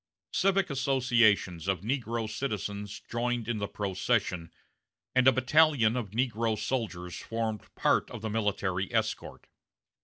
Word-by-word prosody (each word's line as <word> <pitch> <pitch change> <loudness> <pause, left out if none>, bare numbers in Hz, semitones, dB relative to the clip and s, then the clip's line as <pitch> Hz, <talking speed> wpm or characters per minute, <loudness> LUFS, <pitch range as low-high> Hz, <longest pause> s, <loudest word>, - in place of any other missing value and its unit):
Civic 195 -3 +2
associations 120 - +2
of 95 -3 0
negro 115 -1 -2
citizens 105 -4 -4
joined 120 -1 -1
in 115 -2 -1
the 100 - -2
procession, 95 -3 -1 0.6
and 130 0 +4
a - - +9
battalion 130 -2 +4
of 120 -5 -3
negro 115 0 0
soldiers 95 -10 -3
formed 115 -2 -3
part - - +2
of - - -8
the 110 - -2
military 100 -3 -1
escort. - - -2
115 Hz, 125 wpm, -29 LUFS, 100-125 Hz, 0.6 s, a